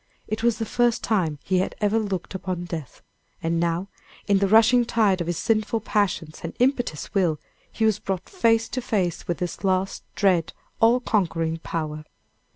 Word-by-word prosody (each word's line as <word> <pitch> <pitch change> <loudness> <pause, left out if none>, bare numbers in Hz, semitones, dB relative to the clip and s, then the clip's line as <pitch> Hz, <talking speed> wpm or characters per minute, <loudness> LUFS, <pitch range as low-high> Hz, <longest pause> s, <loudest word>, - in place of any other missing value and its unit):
It 215 +1 -3
was 235 -1 +2
the 225 - -2
first 240 +1 +1
time 175 -9 0
he 185 -1 +1
had 185 - -2
ever 210 +1 +2
looked 200 -4 -3
upon 185 -2 -3
death, 160 -6 -7 0.4
and 165 +1 0
now, 170 +2 0 0.4
in 200 -1 +3
the 200 - +2
rushing 225 +4 +6
tide 210 -6 +2
of 170 - -3
his 175 -2 -1
sinful 225 +2 +1
passions 190 -7 -1
and 165 - -5
impetuous 245 - 0
will, 175 -7 +2 0.3
he 225 - 0
was 215 -2 +2
brought 190 -3 -3
face 230 - +2
to 255 - -3
face 190 -8 -1
with 175 - -1
this 180 +2 -4
last, 190 0 0
dread, 185 -5 +2 0.3
all 230 +2 +5
conquering 165 -8 0
power! 155 -2 -4
195 Hz, 175 wpm, -24 LUFS, 170-225 Hz, 0.4 s, rushing